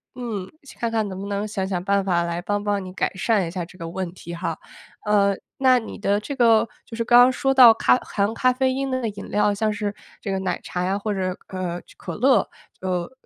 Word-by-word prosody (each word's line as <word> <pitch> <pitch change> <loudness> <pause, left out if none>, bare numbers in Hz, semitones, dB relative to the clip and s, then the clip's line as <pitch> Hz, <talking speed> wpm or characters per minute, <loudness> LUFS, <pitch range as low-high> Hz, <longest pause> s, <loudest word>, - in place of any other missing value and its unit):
嗯， 220 -7 -5 0.2
去 - - -14
看 235 -2 -1
看 220 -2 0
能 190 -1 -6
不 200 - -5
能 205 +1 -2
想 195 -3 -3
想 180 -2 -2
办 200 0 +2
法 175 -3 +1
来 170 0 -3
帮 205 +2 -2
帮 205 -2 0
你 185 - -8
改 - - -1
善 195 -1 +1
一 - - -6
下 180 0 -3
这 180 +2 -13
个 165 -1 -6
问 185 0 -4
题 170 -2 -9
哈。 170 -2 -3 0.5
呃， 200 -1 +3 0.2
那 260 -2 +5
你 225 - -6
的 205 0 +1
这 280 +7 -6
个 230 -3 +4 0.2
就 225 - -9
是 230 - 0
刚 240 +1 +6
刚 250 +1 +7
说 270 +1 +1
到， 250 -3 +9
咖 225 - +3
含 205 -2 -1
咖 255 +2 +3
啡 260 +1 +1
因 270 +1 -2
的 255 0 -1
那 235 - -1
饮 200 0 -9
料， 210 0 +2
像 215 +1 0
是 205 -1 -3 0.3
这 200 - -3
个 190 - -1
奶 185 -2 -2
茶 180 0 -3
呀， 190 +2 0
或 210 +1 -2
者， 185 -1 -2
呃， 180 -2 -3 0.2
可 - - -6
乐， 260 +4 +3 0.3
呃， 185 +2 -2
205 Hz, 265 characters per minute, -23 LUFS, 185-230 Hz, 0.5 s, 到